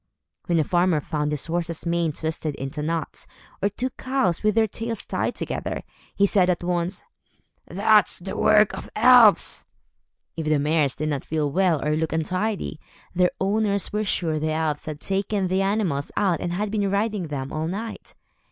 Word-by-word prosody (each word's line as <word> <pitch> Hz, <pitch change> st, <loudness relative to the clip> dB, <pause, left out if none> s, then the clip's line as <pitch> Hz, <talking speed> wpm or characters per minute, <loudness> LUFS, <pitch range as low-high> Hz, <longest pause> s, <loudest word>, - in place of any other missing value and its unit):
When 170 Hz, -2 st, +2 dB
a 155 Hz, -, +3 dB
farmer 175 Hz, 0 st, +2 dB
found 150 Hz, 0 st, -2 dB
his 150 Hz, -2 st, -3 dB
horse's 170 Hz, 0 st, -2 dB
mane 170 Hz, -1 st, +1 dB
twisted 155 Hz, -1 st, -3 dB
into 135 Hz, +3 st, -5 dB
knots, 160 Hz, 0 st, -3 dB, 0.3 s
or 200 Hz, -, +2 dB
two 250 Hz, +5 st, -3 dB
cows 255 Hz, -10 st, 0 dB
with 215 Hz, -1 st, +2 dB
their 225 Hz, -1 st, +4 dB
tails 225 Hz, +1 st, -4 dB
tied -, -, -2 dB
together, -, -, -4 dB, 0.3 s
he 200 Hz, -, +4 dB
said 190 Hz, -2 st, +3 dB
at 175 Hz, -1 st, 0 dB
once, 175 Hz, +1 st, -1 dB, 0.6 s
"That's 210 Hz, 0 st, +3 dB
the 190 Hz, +2 st, -6 dB
work 215 Hz, -1 st, +4 dB
of -, -, -8 dB
elves." 235 Hz, -2 st, +6 dB, 0.7 s
If 160 Hz, -2 st, -4 dB
the 155 Hz, -1 st, +3 dB
mares 150 Hz, -2 st, +1 dB
did 155 Hz, +1 st, -2 dB
not 140 Hz, -3 st, -2 dB
feel 150 Hz, -2 st, -1 dB
well, 175 Hz, -4 st, +2 dB
or 150 Hz, -, +2 dB
looked 160 Hz, 0 st, -1 dB
untidy, 185 Hz, +2 st, -2 dB, 0.3 s
their 180 Hz, 0 st, +3 dB
owners 200 Hz, 0 st, 0 dB
were 210 Hz, 0 st, 0 dB
sure 165 Hz, -6 st, -1 dB
the 155 Hz, +1 st, -1 dB
elves 155 Hz, -2 st, -2 dB
had 150 Hz, -1 st, -5 dB
taken 195 Hz, +1 st, -1 dB
the 190 Hz, +1 st, +1 dB
animals 195 Hz, -8 st, 0 dB
out 190 Hz, -5 st, +1 dB
and 175 Hz, -, -2 dB
had 205 Hz, +3 st, -2 dB
been 205 Hz, -2 st, 0 dB
riding 200 Hz, -2 st, -1 dB
them 140 Hz, -2 st, -5 dB
all 155 Hz, +1 st, -2 dB
night. 215 Hz, +6 st, -6 dB
175 Hz, 180 wpm, -24 LUFS, 155-205 Hz, 0.7 s, elves